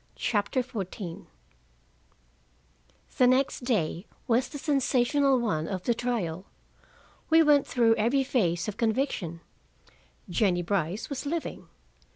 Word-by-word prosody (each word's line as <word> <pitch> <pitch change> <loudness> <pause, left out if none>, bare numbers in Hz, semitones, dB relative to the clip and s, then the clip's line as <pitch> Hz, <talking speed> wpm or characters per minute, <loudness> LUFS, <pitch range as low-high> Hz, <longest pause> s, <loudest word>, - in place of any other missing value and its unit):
CHAPTER 215 +4 0
XIV 195 -7 -6 1.9
The 250 - +6
next 255 0 +1
day 190 -5 -1 0.2
was 240 +1 +2
the 290 - -7
sensational 275 -1 +2
one 165 -10 -1
of 185 -2 -4
the 240 - +2
trial. 205 -8 -3 0.8
We 325 0 +6
went 295 -2 +4
through 230 -2 +3
every 250 +6 +2
phase 175 -10 0
of 210 - -5
conviction: 220 - -1 0.9
Jennie 175 -1 +1
Brice 185 +2 -1
was 280 +1 -4
living. 330 +2 -4
230 Hz, 115 wpm, -27 LUFS, 185-265 Hz, 1.9 s, The